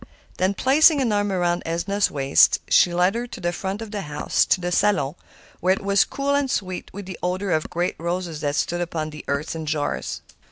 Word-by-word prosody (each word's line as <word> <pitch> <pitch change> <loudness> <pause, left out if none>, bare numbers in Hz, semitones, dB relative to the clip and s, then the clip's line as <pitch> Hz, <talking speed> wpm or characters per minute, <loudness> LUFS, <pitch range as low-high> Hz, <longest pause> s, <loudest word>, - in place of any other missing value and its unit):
Then 190 +2 +1
placing 295 - +5
an 250 -5 +1
arm 205 -1 +1
around 175 -2 0
Edna's 195 +5 0
waist, 140 -1 +4
she 175 - +5
led 180 +2 +2
her 240 +1 -3
to - - -9
the 175 0 -1
front 195 +5 -4
of 220 - -9
the 205 -2 -3
house, 150 -4 0
to - - +3
the 175 0 -3
salon, 175 -8 +2 0.5
where 185 +2 +3
it - - -9
was 200 0 +3
cool 280 0 -2
and 280 -1 +1
sweet 185 -6 -3
with 200 0 -8
the 185 -2 -8
odor 185 +2 -1
of 155 -2 0
great 175 +1 -2
roses 170 -2 -3
that 145 -1 -1
stood 175 +3 -1
upon 160 -3 -3
the 150 -1 -9
hearth 140 +4 -2
in 160 -1 -5
jars. 150 -1 -2
180 Hz, 215 wpm, -23 LUFS, 165-205 Hz, 0.5 s, placing